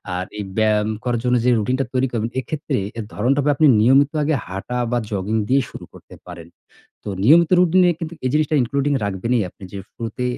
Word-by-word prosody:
আর 90 - -3
এই - - -3
ব্যায়াম 110 -1 +2
করার 120 -2 -1
জন্য 125 0 +2
যে - - +4
রুটিন 125 +5 0
টা 135 - 0
তৈরি 130 +1 +1
করবেন, 115 -1 -2
এক্ষেত্রে 145 +1 -3 0.2
এর 110 - -4
ধরণটা 130 +7 +1
হবে 145 +1 +2
আপনি 155 - +4
নিয়মিত 135 +4 +4
আগে 155 0 +1
হাঁটা 100 +7 -5
বা 120 - +1
জগিং 100 +2 -2
দিয়ে 135 +1 +3
শুরু - - -10
করতে - - -15
পারেন। 85 -2 -10 0.6
তো - - -6 0.2
নিয়মিত 165 +5 +5
রুটিনে 180 0 +4
কিন্তু 165 -1 -7
এই - - +1
জিনিসটা 155 0 +1
including 140 +4 -1
রাখবেনই 105 +4 -1
আপনি 100 - -25
যে 100 - -6
শুরুতে 115 +2 -5
125 Hz, 200 wpm, -20 LUFS, 105-145 Hz, 0.6 s, নিয়মিত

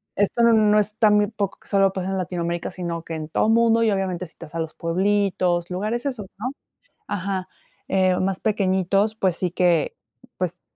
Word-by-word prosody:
esto 205 +4 +1
no 215 -2 +5
es 210 0 -1
tan, 210 -2 +5
muy 210 0 +3
poco, 205 -2 -4
que - - -16
solo 195 -1 +3
pasa 190 -1 -3
en 195 - -1
Latinoamérica, 170 -2 -3
sino 170 -2 -4
que 165 - -6
en 155 -1 -6
todo 215 - +1
mundo 230 0 +4
y, 220 - +3
obviamente, 185 -2 -1
citas 165 -1 -12
a - - -2
los 160 -1 -3
pueblitos, 180 -1 0
lugares 215 +7 -2
esos, 250 -8 -3
¿no? 245 +6 -3 0.6
Ajá, 190 -1 -3 0.4
eh, 185 -1 +3
más 190 0 0
pequeñitos, 195 0 +1
pues 190 -5 +1
sí 180 - -1
que, 175 -3 +1 0.4
pues, 180 -1 -3
190 Hz, 185 wpm, -23 LUFS, 175-210 Hz, 0.6 s, no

